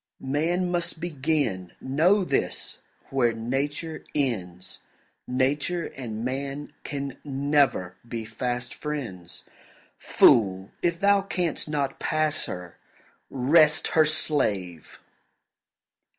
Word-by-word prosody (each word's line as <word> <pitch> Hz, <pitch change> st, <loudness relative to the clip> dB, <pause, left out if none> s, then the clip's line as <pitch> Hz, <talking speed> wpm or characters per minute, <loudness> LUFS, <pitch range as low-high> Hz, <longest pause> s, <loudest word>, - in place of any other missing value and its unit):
Man 175 Hz, +4 st, +1 dB
must 170 Hz, -2 st, -1 dB
begin, 140 Hz, -, -1 dB
know 170 Hz, +10 st, +3 dB
this, -, -, -1 dB, 0.3 s
where 125 Hz, -4 st, +3 dB
Nature 140 Hz, +7 st, -3 dB
ends; 95 Hz, -11 st, -2 dB, 0.5 s
Nature 140 Hz, +7 st, 0 dB
and 115 Hz, -3 st, -5 dB
man 140 Hz, +3 st, -4 dB
can 140 Hz, -2 st, -5 dB
never 140 Hz, -9 st, +1 dB
be 115 Hz, -1 st, -4 dB
fast 125 Hz, +2 st, -3 dB
friends. 120 Hz, -, -6 dB, 0.6 s
Fool, 95 Hz, -4 st, +4 dB
if 170 Hz, -1 st, +1 dB
thou 200 Hz, 0 st, +5 dB
canst 180 Hz, -6 st, -2 dB
not 140 Hz, -3 st, -1 dB
pass 155 Hz, -1 st, 0 dB
her, 90 Hz, -1 st, -7 dB, 0.5 s
rest 155 Hz, +4 st, +4 dB
her 160 Hz, -1 st, +5 dB
slave! 100 Hz, -, -1 dB
140 Hz, 95 wpm, -26 LUFS, 115-155 Hz, 0.6 s, thou